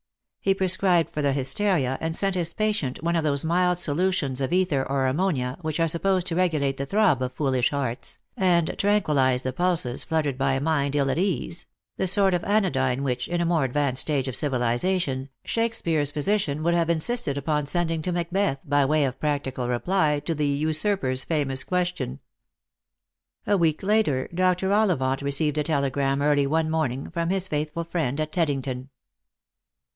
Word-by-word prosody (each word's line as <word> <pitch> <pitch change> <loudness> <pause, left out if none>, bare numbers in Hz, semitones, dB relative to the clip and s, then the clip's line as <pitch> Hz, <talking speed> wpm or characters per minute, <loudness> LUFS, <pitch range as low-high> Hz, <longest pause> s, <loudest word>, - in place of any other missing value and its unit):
He 195 0 +3
prescribed 185 -2 +2
for 150 - -3
the 140 -1 +1
hysteria, 135 0 0
and 160 0 -2
sent 195 +1 +1
his 170 -2 -1
patient 205 -12 -1
one 170 +1 0
of 165 - +1
those 140 -2 0
mild 180 +2 +2
solutions 155 -5 0
of 135 - -1
ether 180 -7 +1
or 135 -1 +1
ammonia 130 -3 -1
which 155 -1 -3
are 165 - +3
supposed 180 +3 0
to 170 - -1
regulate 155 -7 +1
the 140 - -4
throb 195 - +2
of 130 0 -2
foolish 130 -3 +1
hearts, 135 -4 -4 0.2
and 175 -3 +2
tranquillise 150 -11 +2
the 130 - -2
pulses 170 -6 0
fluttered 150 -5 -1
by 135 0 +2
a 135 - 0
mind 145 -1 0
ill 140 -2 +2
at 160 - -1
ease; 180 -3 -2 0.3
the 190 - 0
sort 195 0 +3
of 175 - 0
anodyne 140 -11 +1
which, 125 -2 -2
in 175 0 -2
a 170 - +1
more 165 -3 +2
advanced 135 0 +1
stage 140 -4 0
of 130 - -1
civilisation, 135 +2 0 0.2
Shakespeare's 170 -11 0
physician 155 -1 -1
would 170 +1 +2
have 170 -1 +1
insisted 170 - 0
upon 150 0 -1
sending 165 0 -1
to 180 - -3
Macbeth 175 -3 -1
by 145 0 +2
way 150 +1 +2
of 130 -1 -4
practical 135 -4 -2
reply 150 +4 +1
to 165 +3 -2
the 150 -2 -1
usurper's 150 -2 +1
famous 140 -4 -1
question. 180 - -2 1.3
A 205 - +2
week 165 -3 +1
later 195 -11 +1
Dr. 185 +2 +1
Ollivant 140 -12 +1
received 145 +2 0
a - - +1
telegram 140 -2 0
early 145 -1 +3
one 160 +2 0
morning 140 -4 -2
from 170 0 -2
his 190 0 0
faithful 155 +1 -2
friend 160 -5 -2
at 155 0 -2
Teddington. 135 -6 -2
155 Hz, 175 wpm, -25 LUFS, 135-180 Hz, 1.3 s, He